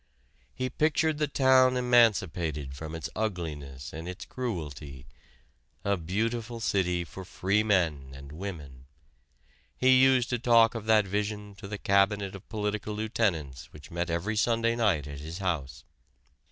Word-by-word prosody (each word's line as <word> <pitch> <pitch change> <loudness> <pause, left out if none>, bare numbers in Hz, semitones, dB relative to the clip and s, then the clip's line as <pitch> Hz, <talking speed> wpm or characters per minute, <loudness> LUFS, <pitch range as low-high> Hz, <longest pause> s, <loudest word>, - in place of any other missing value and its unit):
He 130 - -2
pictured 155 +3 +1
the 150 - +1
town 130 -2 +4
emancipated 90 - +2
from 80 +3 -7
its 80 - -4
ugliness 80 -11 -4
and 80 +3 -6
its 90 +2 -7
cruelty 75 - -6 0.8
a 100 0 +2
beautiful 115 +7 -2
city 90 -5 0
for 95 +3 -9
free 95 +3 0
men 85 -10 +1
and 70 +1 -11
women. 75 -7 -8 0.9
He 130 0 +5
used 130 -2 +4
to 120 - 0
talk 115 -1 +5
of 115 -3 -6
that 110 -2 +5
vision 105 +1 -3
to 100 - -8
the 105 +1 -5
'cabinet' 100 0 +2
of 95 - -11
political 105 -1 -3
lieutenants 95 - -2
which 75 - -13
met 85 +1 -2
every 85 +6 -1
Sunday 115 +1 +2
night 100 - +1
at 70 -1 -7
his 80 +3 -7
house. 70 -10 -3
100 Hz, 145 wpm, -28 LUFS, 80-115 Hz, 0.9 s, He